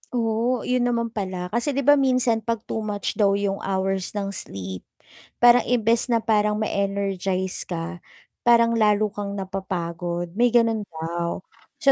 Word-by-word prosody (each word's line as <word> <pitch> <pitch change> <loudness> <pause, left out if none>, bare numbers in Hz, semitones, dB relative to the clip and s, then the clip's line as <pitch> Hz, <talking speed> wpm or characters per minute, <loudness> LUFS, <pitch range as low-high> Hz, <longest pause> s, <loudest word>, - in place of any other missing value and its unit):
Oo, 230 +2 0
yun 250 -1 +1
naman 235 -1 -1
pala 185 -4 -4
kasi 240 +5 -1
'di 280 - 0
ba 290 +1 +6
minsan 255 -4 +2
pag 230 0 -3
too - - -4
much 210 0 -3
daw 200 -1 +4
yung 200 -1 -1
hours 190 0 -2
ng 200 -1 -2
sleep, 95 - -6 0.6
parang 240 0 +7
imbes 230 -1 +2
na 230 -2 +1
parang 210 -1 +2
ma 215 - -1
energize 195 -2 -2
ka 175 0 -5 0.5
parang 235 -1 +6
lalo 210 -1 +3
kang 200 -1 -5
napapagod 175 -3 -4
may 235 +7 +3
ganun 230 -3 +2
daw, 170 +2 -4 0.4
so 275 - +7
205 Hz, 155 wpm, -24 LUFS, 190-230 Hz, 0.6 s, parang